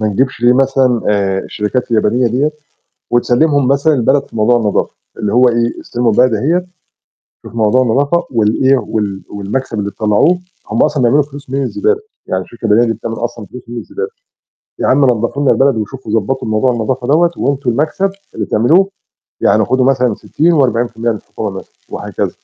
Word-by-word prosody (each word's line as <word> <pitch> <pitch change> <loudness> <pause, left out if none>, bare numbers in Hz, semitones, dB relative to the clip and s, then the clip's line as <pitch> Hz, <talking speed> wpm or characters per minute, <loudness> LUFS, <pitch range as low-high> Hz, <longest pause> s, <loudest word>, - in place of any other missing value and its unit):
ما 110 - +1
نجيبش 130 +4 -1
ليه 120 +1 +5
مثلًا 130 -2 +2
آآ، 100 -2 +1
الشركات 105 +6 -3
اليابانية 115 +2 +2
دِيَّة 130 +6 +1 0.6
وتسلّمهم 130 +3 +2
مثلًا 140 +3 +3
البلد 135 +2 +2
في - - -11
موضوع 115 +3 +3
النضافة، 105 -3 0 0.2
اللي 105 - -2
هو 125 +1 +5
إيه، 120 0 -1
استلموا 120 -1 -1
البلد 125 +2 +3
أهِيّة، 165 - 0 0.8
شوفوا 115 - -9
موضوع 110 +3 +3
النضافة 140 +8 +1
وال 110 0 +1
إيه 135 +1 +5
وال 105 -4 -3
والمكسب 105 +4 -4
اللي 100 0 -3
تطلّعوه 110 - +2 0.3
هم 110 - +1
أصلًا 150 -4 +1
بيعملوا 140 +5 +4
فلوس 140 -1 -12
من 135 +1 -1
الزبالة 415 - 0 0.3
يعني 95 0 -1
الشركة 115 +2 -10
اليابانية 115 +2 +3
دي - - 0
بتعمل 115 0 -5
أصلًا 120 -2 -5
فلوس 125 +6 -11
من 120 - -6
الزبالة، 425 - -5 0.7
يا - - 0
عَم 140 +2 +4
نضّفوا 125 +2 0
لنا 140 - +3
البلد 135 -2 +2
وشوفوا 110 +1 -5
ضبّطوا 130 +4 -3
موضوع 110 +4 +2
النضافة 120 +2 -2
دَوَّة 170 +4 +3
وأنتم 140 -2 -1
المكسب 160 +10 0 0.2
اللي - - -3
بتعملوه 160 - +3 0.5
يعني - - +3
خدوا 130 0 +1
مثلًا 125 -4 +2
60 170 +10 0
و40% 120 -5 +1
للحكومة 105 0 -6
مثلًا 95 0 -9 0.2
وهكذا. - - -3
125 Hz, 175 wpm, -15 LUFS, 110-135 Hz, 0.8 s, ليه